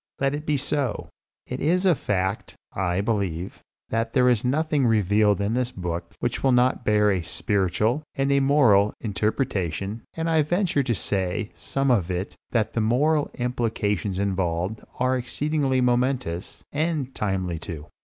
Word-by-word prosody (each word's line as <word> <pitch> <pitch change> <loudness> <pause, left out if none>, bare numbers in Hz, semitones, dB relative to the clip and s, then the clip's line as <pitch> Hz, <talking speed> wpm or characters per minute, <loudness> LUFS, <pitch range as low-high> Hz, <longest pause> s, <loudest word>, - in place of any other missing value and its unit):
Let 135 0 +1
it 150 +2 -5
be 150 -1 +2
so. 140 -3 -2 0.4
It - - -5
is 180 +5 +1
a 185 - +6
fact, 95 - -2 0.2
I 90 -1 0
believe, 100 -5 -2 0.3
that 115 0 -1
there 125 -1 +4
is 120 -4 +2
nothing 145 +1 +1
revealed 105 -1 +3
in 100 +2 0
this 125 0 0
book 85 -3 -5
which 120 - -2
will 135 - +3
not 125 +1 +3
bear 105 -1 +3
a 95 -2 0
spiritual, 100 - 0
and 135 0 +1
a 140 - +4
moral, 125 -8 +4
interpretation; 105 - -2
and 165 0 -2
I 160 -1 +3
venture 175 0 +1
to 120 -3 0
say 95 +2 -2
of - - -28
some 135 -1 0
of 95 -8 +2
it 90 +2 -3
that 110 -2 0
the 115 - 0
moral 145 +7 +2
implications 110 -6 -1
involved 95 0 -1 0.2
are 130 +1 +2
exceedingly 135 +1 0
momentous, 125 -7 0
and 150 -3 -1
timely 95 -5 -2
too. 80 -2 -7
115 Hz, 160 wpm, -25 LUFS, 100-135 Hz, 0.4 s, a